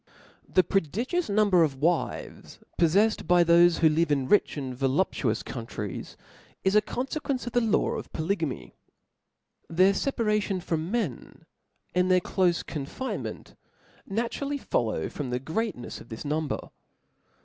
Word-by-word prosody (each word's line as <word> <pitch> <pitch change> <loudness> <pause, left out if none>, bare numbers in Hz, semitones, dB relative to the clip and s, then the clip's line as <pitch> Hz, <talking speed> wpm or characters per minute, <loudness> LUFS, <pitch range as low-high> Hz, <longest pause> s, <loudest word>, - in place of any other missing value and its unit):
TH - - -13
E - - +9
prodigious 215 - -1
number 200 -3 +4
of 150 -4 +2
wives 160 +5 -2 0.2
poffefled 200 +7 +3
by 175 0 +5
B 170 0 +3
o - - +8
p 170 - +8
|^ - - +9
thofe 175 - -1
who 160 - +6
live 160 +1 +1
in 135 -3 +1
rich 205 - +3
apd 135 -3 -4
voluptuous 135 - 0
coun 115 -3 -6
chap. - - -14
i, - - -13
tries, - - -8 0.5
is 190 +2 +2
a 210 - +7
confequencc 270 +2 -3
of 240 - -5
the 245 - +3
law 225 -3 +2
of - - -5
polygamy, 160 -3 -2 1.0
^9' - - -7
' - - -11
Their 190 +2 +6
feparacion 210 -5 0
from 165 0 -2
men, 200 - -3 0.5
and 180 +1 +2
tbeir 185 0 +4
clofe 175 -1 +1
con 140 -4 -5
finement, 260 - -5 0.5
naturally 240 +7 -2
follow 110 - -1
from 140 -4 -5
the 125 0 -1
greatncfs 160 - -4
of 115 - -14
this 110 +4 -7
number. 150 0 -2
175 Hz, 170 wpm, -27 LUFS, 150-210 Hz, 1.0 s, E